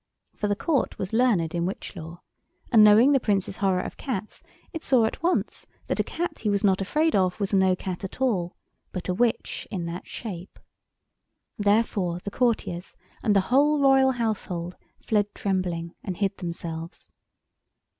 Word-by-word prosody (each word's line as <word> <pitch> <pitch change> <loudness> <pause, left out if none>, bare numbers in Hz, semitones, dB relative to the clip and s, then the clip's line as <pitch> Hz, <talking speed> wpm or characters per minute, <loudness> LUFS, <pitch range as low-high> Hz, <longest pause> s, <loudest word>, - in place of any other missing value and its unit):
For 210 - -2
the 205 - +1
Court 285 +4 0
was 190 +3 -5
learned 215 -9 +2
in 170 0 0
witch 195 - -6
law, 170 0 -9 0.5
and 225 -3 +7
knowing 215 +6 +7
the 275 - +4
Prince's 200 -4 0
horror 190 -2 +1
of - - -7
cats 215 -6 -5 0.3
it 325 - -4
saw 255 -7 +3
at 220 - -3
once 350 +2 -1 0.2
that - - -2
a - - +3
cat 335 -2 -4
he 215 - -1
was 200 0 +1
not 195 -1 +3
afraid 310 +11 +1
of 185 -1 +1
was 200 0 -2
no 190 -1 +4
cat 185 +1 -5
at 195 - -7
all, 195 -10 0 0.4
but 185 0 -5
a - - +2
witch 235 +4 -1
in 180 -5 -3
that 170 +2 -6
shape. 190 -5 -7 1.0
Therefore 205 -4 +1
the 200 +3 -6
courtiers 215 -8 -1 0.3
and 210 -3 +2
the 195 - +5
whole 295 +2 +4
Royal 270 -1 +5
household 190 -7 -3 0.2
fled 210 -2 0
trembling 180 -4 -2
and 185 -3 -4
hid 200 -1 0
themselves. 170 -1 -6
200 Hz, 170 wpm, -26 LUFS, 180-235 Hz, 1.0 s, and